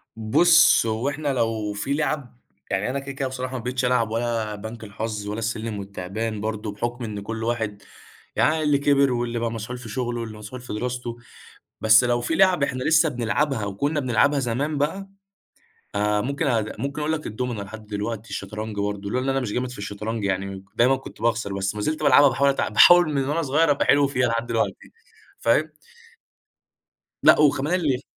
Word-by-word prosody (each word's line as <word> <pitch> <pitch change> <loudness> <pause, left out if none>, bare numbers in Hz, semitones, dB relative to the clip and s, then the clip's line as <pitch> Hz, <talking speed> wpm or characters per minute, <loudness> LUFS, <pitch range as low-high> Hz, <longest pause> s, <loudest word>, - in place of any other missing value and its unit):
بُصّ 115 +8 +5
هو 115 +4 -1
إحنا 145 +1 -4
لو 110 -4 -1
في 105 +7 -2
لِعَب 145 -4 -2 0.3
يعني 95 +5 0
أنا 135 +2 -2
كده، 140 0 -7
كده 135 0 -3
بصراحة 130 0 -4
ما 120 - -7
بقيتش 125 +1 -1
ألعب 125 -3 +1
ولا 115 -2 -1
بنك 110 +2 -8
الحظ 105 0 -5
ولا 105 +2 -3
السلّم 110 -1 -3
والتعبان 100 +3 -4
برضو، 110 -1 -3
بحكم 120 +4 -4
إن 105 -3 -5
كُلّ 110 +2 -5
واحد 110 -3 -2 0.5
يعني 155 0 +2
اللي 145 -1 +3
كِبِر 140 -1 +3
واللي 120 -1 -1
بقى 115 0 -1
مسحول 115 +2 -5
في 120 -2 -10
شغله 120 +2 -3
واللي 110 -2 -7
مسحول 105 +4 -9
في 125 - -7
دراسته، 120 +1 -4 0.6
بس 110 +2 +6
لو 120 0 +1
في 160 - -1
لِعَب 185 -4 +4
إحنا 130 -2 -1
لسه 160 +2 +4
بنلعبها 120 0 -1
وكنا 140 +10 -1
بنلعبها 135 +2 +2
زمان 135 +5 -1
بقى، 175 +8 -2 0.9
آآ، 105 0 +1
ممكن 140 +5 -2
أ 115 -4 +2 0.2
ممكن 140 +2 -3
أقول 155 +2 0
لك 150 - -4
الدُومنة 115 -2 -3
لحد 110 +1 -11
دلوقتي، 105 +1 -4
الشطرنج 105 +1 -5
برضو، 100 0 -3
لولا 125 +3 -1
إن 135 - 0
أنا 135 - +1
مش 125 -6 -3
جامد 125 0 -2
في 125 - -10
الشطرنج 105 +2 -4
يعني 95 -1 0
م 95 0 -8
دايمًا 125 +4 +4
كنت 130 - -11
باخسر، 115 -3 0
بس 100 +1 -2
ما 105 - -4
زِلت 155 +7 -2
بالعبها 145 0 +7
باحاول 140 +2 +2
أتع 135 - 0
باحاول 175 -2 +7
من 135 0 0
وأنا 165 +3 0
صغيّر 150 +2 +2
أبقى 140 - +1
حلو 145 0 +4
فيها 125 -3 +1
لحد 115 0 -1
دلوقتي، 115 -1 -2 0.5
فاهم؟ 150 +7 +2 1.5
لأ - - +7
وكمان 150 +4 +2
ال 135 -6 0
120 Hz, 190 wpm, -24 LUFS, 110-140 Hz, 1.5 s, بالعبها